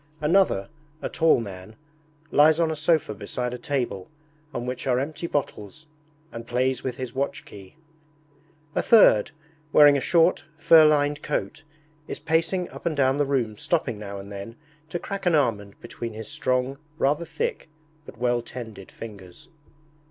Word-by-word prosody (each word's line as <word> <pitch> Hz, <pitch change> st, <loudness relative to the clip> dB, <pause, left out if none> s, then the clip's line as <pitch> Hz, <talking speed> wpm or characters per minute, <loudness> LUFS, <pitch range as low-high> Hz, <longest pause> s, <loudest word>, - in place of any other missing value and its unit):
Another, 155 Hz, -, +2 dB, 0.3 s
a -, -, -4 dB
tall 160 Hz, -5 st, +3 dB
man, 100 Hz, -1 st, -8 dB, 0.6 s
lies 155 Hz, +2 st, +5 dB
on 165 Hz, -1 st, +2 dB
a -, -, -2 dB
sofa 155 Hz, -5 st, +1 dB
beside 120 Hz, +4 st, -4 dB
a 125 Hz, -, -6 dB
table 120 Hz, -9 st, -3 dB, 0.4 s
on 120 Hz, -3 st, -4 dB
which 125 Hz, +1 st, -4 dB
are 125 Hz, -1 st, +2 dB
empty 155 Hz, +5 st, -3 dB
bottles, 145 Hz, -2 st, -4 dB, 0.5 s
and 115 Hz, 0 st, -8 dB
plays 125 Hz, +1 st, 0 dB
with 130 Hz, -1 st, -4 dB
his 130 Hz, -2 st, -5 dB
watch 140 Hz, +1 st, -3 dB
key. 100 Hz, +4 st, -13 dB, 1.0 s
A -, -, +1 dB
third, 200 Hz, -, +6 dB, 0.4 s
wearing 145 Hz, -1 st, +7 dB
a -, -, -2 dB
short, 170 Hz, +2 st, +3 dB
fur 160 Hz, 0 st, +7 dB
lined 145 Hz, -1 st, +2 dB
coat, 150 Hz, -, -3 dB, 0.5 s
is -, -, -5 dB
pacing 165 Hz, +4 st, 0 dB
up -, -, -6 dB
and 155 Hz, -3 st, -2 dB
down 135 Hz, 0 st, +3 dB
the 145 Hz, -1 st, +1 dB
room 120 Hz, -6 st, -1 dB
stopping 125 Hz, -9 st, -1 dB
now 100 Hz, -1 st, -7 dB
and 100 Hz, +1 st, -9 dB
then 100 Hz, +3 st, -8 dB, 0.3 s
to 175 Hz, -, -2 dB
crack 195 Hz, +1 st, -5 dB
an 170 Hz, -, +4 dB
almond 105 Hz, -8 st, 0 dB
between 120 Hz, -1 st, -7 dB
his 110 Hz, 0 st, -8 dB
strong, 130 Hz, +2 st, -1 dB, 0.2 s
rather 150 Hz, +4 st, +1 dB
thick, 455 Hz, -, -4 dB, 0.4 s
but -, -, -11 dB
well 120 Hz, 0 st, +1 dB
tended 110 Hz, -5 st, -9 dB
fingers. 105 Hz, -, -11 dB
130 Hz, 160 wpm, -25 LUFS, 115-155 Hz, 1.0 s, wearing